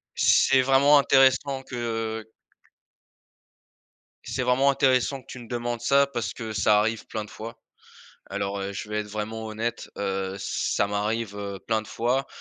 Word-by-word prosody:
C'est 135 -1 +5
vraiment 135 +3 +5
intéressant 135 0 +3
que, 130 - -9
heu 115 -2 -3 1.9
c'est 130 - -3
vraiment 125 +3 +3
intéressant 135 0 +2
que - - -27
tu 130 - -9
me 120 - -11
demandes 120 -1 -3
ça, 140 +3 +4
parce 120 -9 -3
que 110 -2 -6
ça 105 0 +4
arrive 110 +1 -1
plein 110 -1 -4
de 105 - -16
fois. 115 +2 -8 0.7
Alors, 100 0 -3
heu, 100 +1 -4
je 100 - -6
vais 105 0 -1
être 105 - -7
vraiment 110 +1 -5
honnête, 110 +2 -4
heu, 95 -1 -2
ça 100 0 -1
m'arrive, 105 +1 -2
heu, 100 -1 -5
plein 110 -1 +1
de 110 - -14
fois, 125 +5 0
115 Hz, 165 wpm, -25 LUFS, 105-130 Hz, 1.9 s, C'est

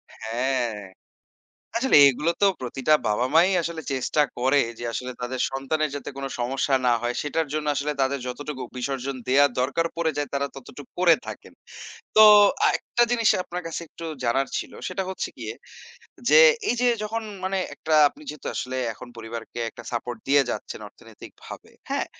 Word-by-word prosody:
হ্যাঁ। 120 +1 -1 1.0
আসলে 265 +3 +3
এগুলো 150 +5 +1
তো 200 - +6 0.2
প্রতিটা 135 +4 0
বাবা-মা 125 +9 +3
ই - - 0
আসলে 165 -1 -4
চেষ্টা 135 +3 +1 0.2
করে 135 +3 +3 0.2
যে, - - -6
আসলে 125 +3 -4
তাদের 125 +1 -4
সন্তানের 145 +3 -1
যাতে 140 - -6
কোন 140 - -4
সমস্যা 135 +3 0
না 120 - +5
হয়। 120 0 -1
সেটার 150 +2 -1
জন্য 155 -1 -2
আসলে 145 +2 -1
তাদের 135 +1 0
যতটুকু 135 +1 -5
বিসর্জন 135 +1 -3
দেয়ার 140 +2 +5
দরকার 140 +6 0
পড়ে 165 -1 0
যায় 145 - -2
তারা 140 0 0
ততটুক 135 +1 -11
করে 175 -2 +6
থাকেন। - - -9 0.6
তো 215 - +9 0.4
আ - - +6
একটা 240 - 0
জিনিস 230 -3 +2 0.2
আপনার 180 +1 -6
কাছে 165 - -4
একটু 165 - -11 0.2
জানার 135 +3 +1
ছিল। - - -6 0.2
সেটা 190 - -3
হচ্ছে 190 - -4
গিয়ে - - -5 0.8
যে, - - +8 0.3
এই - - +2
যে 250 - +4 0.2
যখন 225 +2 -3 0.2
মানে 190 +1 -1 0.2
একটা 160 - -3 0.2
আপনি 290 - -18
যেহেতু 150 - -7
আসলে 130 +1 -3 0.2
এখন 125 +3 -11
পরিবারকে 115 +1 -7
একটা 120 - -12
সাপোর্ট 120 0 -4
দিয়ে 140 +1 +5
যাচ্ছেন - - -5
অর্থনৈতিকভাবে, - - -13 0.2
হ্যাঁ? - - -1
140 Hz, 170 wpm, -24 LUFS, 125-160 Hz, 1.0 s, তো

